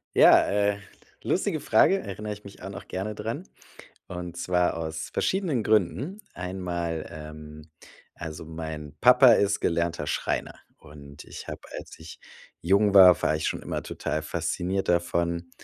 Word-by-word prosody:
Ja, - - +7
äh, 100 0 +1 0.4
lustige - - 0
Frage, 195 - +4
erinner 105 +2 -6
ich 105 0 -8
mich 100 -2 -13
auch 95 - -6
noch 95 - -9
gerne 100 +3 -4
dran, 140 - -5 0.6
und 90 -1 -6
zwar 90 -1 +1
aus 80 -1 -5
verschiedenen 175 - 0
Gründen. 135 - +1
Einmal, 90 -3 -4
ähm 75 0 -10 0.4
also 80 -1 -7
mein 80 -2 -7
Papa 125 0 +7
ist 100 0 +2
gelernter 85 -2 0
Schreiner. - - -2 0.2
Und 70 0 -13
ich - - -10
hab, - - -6 0.2
als - - -10
ich 80 0 -11 0.4
jung 100 +4 +3
war 95 -3 +8
war 75 - +2
ich 80 - -2
schon - - -3
immer - - -4
total 80 - -3
fasziniert 90 +4 -2
davon, 85 0 0
90 Hz, 145 wpm, -26 LUFS, 80-100 Hz, 0.6 s, war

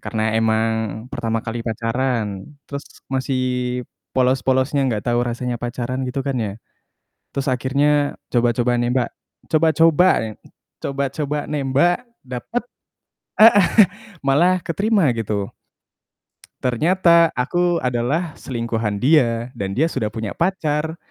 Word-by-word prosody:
Karena 110 -1 -1
emang 110 0 +2 0.4
pertama 115 0 -2
kali 115 +1 -4
pacaran, 115 -3 -1 0.2
terus 140 0 -6 0.3
masih 125 -2 -1 0.3
polos-polosnya 130 +2 +2
nggak 105 -4 -2
tahu 120 - +2
rasanya 120 0 -3
pacaran 125 +2 -3
gitu 135 +2 -3
kan 135 - -1
ya. 105 -3 -2 0.8
Terus 140 +1 -3
akhirnya 145 +3 +1 0.2
coba-coba 120 0 +2
nembak. 120 0 0 0.4
Coba-coba 165 +2 +4 0.2
ya. 110 - -5 0.5
Coba-coba 140 +2 -2
nembak 150 - +1 0.2
dapet 130 - -4 0.8
heeh. 205 -4 +8 0.6
Malah 175 +7 +4
keterima 195 - +2
gitu. 105 -3 -2 1.2
Ternyata 170 +6 +4
aku 175 +7 +1
adalah 125 +8 0
selingkuhan 115 -4 -2
dia 125 -4 +3
dan 95 -1 -4
dia 155 +5 +3
sudah 110 -5 -1
punya 110 -1 -4
pacar 160 -3 -1
130 Hz, 110 wpm, -21 LUFS, 115-150 Hz, 1.2 s, heeh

